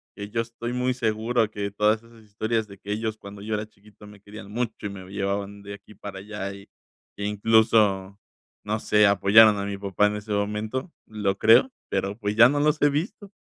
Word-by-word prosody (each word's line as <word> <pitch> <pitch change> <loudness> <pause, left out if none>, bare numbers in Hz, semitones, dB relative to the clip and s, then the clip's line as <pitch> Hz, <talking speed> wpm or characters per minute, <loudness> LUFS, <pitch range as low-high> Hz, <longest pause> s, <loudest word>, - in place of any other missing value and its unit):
que 100 0 -7
yo 115 +2 -1
estoy 115 +1 -6
muy 125 0 0
seguro 115 -1 0
que 100 -1 -4
todas 105 +2 +1
esas 115 -1 -18
historias 110 +1 -2
de 100 -1 -13
que 100 +2 -8
ellos 110 +1 -2
cuando 100 -1 -11
yo 110 +1 -4
era 105 0 -4
chiquito, 105 0 -19
me 105 0 -14
querían 105 0 -11
mucho 115 -1 -4
y - - -2
me 95 -2 -9
llevaban 100 0 -3
de 100 0 -8
aquí 100 +1 -14
para 95 0 -8
allá 100 -1 -6
y 100 0 -13 0.5
que 100 - -5
incluso, 105 -2 +2 0.5
no 110 +1 -1
sé, 105 0 +3
apoyaron 105 +2 +6
a 100 - -3
mi 100 -1 -4
papá 100 +1 +1
en 105 - -2
ese 105 +1 -8
momento, 105 - -2
lo 100 -2 -2
creo, 115 - +5 0.2
pero 100 +1 -2
pues 105 -2 -3
ya 115 +2 +8
no 145 +1 0
los 150 +1 +1
he 145 - +5
visto. 190 +7 -4
105 Hz, 210 wpm, -25 LUFS, 100-110 Hz, 0.5 s, ya